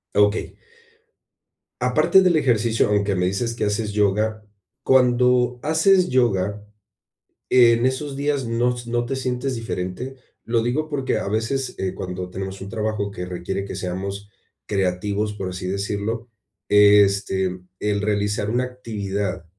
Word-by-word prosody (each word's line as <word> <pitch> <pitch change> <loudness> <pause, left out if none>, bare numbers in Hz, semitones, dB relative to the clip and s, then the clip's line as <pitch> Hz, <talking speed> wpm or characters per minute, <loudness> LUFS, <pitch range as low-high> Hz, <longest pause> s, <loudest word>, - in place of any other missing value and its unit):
Okey. 105 +1 +2 1.2
Aparte 190 - +4
del 180 -2 +3
ejercicio, 115 -7 +2
aunque 100 -1 +1
me 90 0 +1
dices 115 +5 -1
que 110 - -1
haces 105 +1 -1
yoga, 105 +1 +1 0.4
cuando 125 -1 +3
haces 180 +4 +3
yoga, 105 -5 +1 0.9
¿en 120 -1 +5
esos 135 +2 -1
días 140 -1 -1
no 120 +2 +1
s 120 -1 -8
no 120 0 0
te 135 - -3
sientes 130 0 -2
diferente? 115 +3 -4 0.3
Lo 115 0 +1
digo 145 +7 -1
porque 140 -3 -1
a - - -3
veces, 115 +6 -1
eh, 95 -1 -2
cuando 90 -1 -5
tenemos 95 +1 -6
un 100 - -7
trabajo 105 -1 -2
que 90 -2 -6
requiere 90 +2 -4
que 100 - -6
seamos 95 +2 -5 0.4
creativos, 100 +2 -1
por 95 -3 -4
así 90 0 -5
decirlo, 105 +4 -3 0.4
este, 100 -2 +4 0.2
el 105 -1 0
realizar 105 0 0
una 125 +2 +1
actividad 100 -7 -4
105 Hz, 140 wpm, -22 LUFS, 100-125 Hz, 1.2 s, en